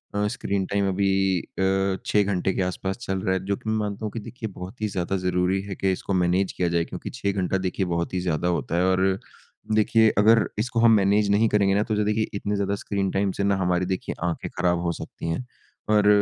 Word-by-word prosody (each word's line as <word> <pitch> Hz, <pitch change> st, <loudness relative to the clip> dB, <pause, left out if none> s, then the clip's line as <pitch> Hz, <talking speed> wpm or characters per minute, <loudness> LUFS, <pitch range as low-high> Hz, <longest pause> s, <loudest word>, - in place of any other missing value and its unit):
अ, 105 Hz, 0 st, +1 dB
screen 100 Hz, -1 st, -2 dB
time 100 Hz, -1 st, +1 dB
अभी 95 Hz, +1 st, +1 dB, 0.3 s
अ, 95 Hz, +1 st, 0 dB
6 105 Hz, -1 st, +3 dB
घंटे 95 Hz, -1 st, 0 dB
के -, -, -1 dB
आस-पास 95 Hz, +1 st, -2 dB
चल 95 Hz, -4 st, -2 dB
रहा 95 Hz, -, 0 dB
है 95 Hz, 0 st, -1 dB
जो 100 Hz, 0 st, 0 dB
कि 110 Hz, -, -6 dB
मैं 110 Hz, -, +1 dB
मानता 105 Hz, 0 st, -3 dB
हूँ 105 Hz, -, -3 dB
कि 115 Hz, -, -5 dB
देखिए 110 Hz, +1 st, -7 dB
बहुत 95 Hz, +6 st, -8 dB
ही 110 Hz, -, +1 dB
ज़्यादा 95 Hz, 0 st, -2 dB
ज़रूरी 90 Hz, +1 st, 0 dB
है 95 Hz, -, -4 dB
कि 95 Hz, +1 st, 0 dB
इसको 95 Hz, +1 st, -3 dB
मैनेज 90 Hz, +1 st, +2 dB
किया 90 Hz, -, -1 dB
जाए, 85 Hz, -1 st, +1 dB
क्योंकि 90 Hz, -, -7 dB
6 100 Hz, -5 st, -2 dB
घंटा 95 Hz, -1 st, 0 dB
देखिए 95 Hz, +1 st, -1 dB
बहुत 85 Hz, 0 st, -2 dB
ही 90 Hz, -, 0 dB
ज़्यादा 90 Hz, -1 st, -1 dB
होता 85 Hz, -1 st, -1 dB
है। 90 Hz, -, +3 dB
और 95 Hz, +1 st, +2 dB, 0.6 s
देखिए 110 Hz, +1 st, +4 dB
अगर 110 Hz, +3 st, +5 dB
इसको 115 Hz, +1 st, 0 dB
हम 115 Hz, 0 st, +6 dB
मैनेज 100 Hz, +1 st, +3 dB
नहीं 110 Hz, +2 st, +4 dB
करेंगे 100 Hz, -2 st, +3 dB
ना 105 Hz, -, +3 dB
तो 110 Hz, -, -2 dB
जो 105 Hz, -, +1 dB
देखिए 105 Hz, +1 st, +1 dB
इतनी 100 Hz, 0 st, -2 dB
ज़्यादा 100 Hz, 0 st, 0 dB
स्क्रीन 100 Hz, -1 st, -2 dB
टाइम 95 Hz, 0 st, +1 dB
से 100 Hz, -, 0 dB
ना 100 Hz, 0 st, +2 dB
हमारी 90 Hz, -1 st, +1 dB
देखिए 95 Hz, 0 st, -3 dB
आँखें 85 Hz, -, -3 dB
ख़राब 90 Hz, -1 st, +2 dB
हो 85 Hz, -, 0 dB
सकती 85 Hz, -, -7 dB
हैं। 85 Hz, +10 st, -2 dB, 0.4 s
और 105 Hz, -1 st, +4 dB
95 Hz, 235 wpm, -25 LUFS, 90-105 Hz, 0.6 s, हम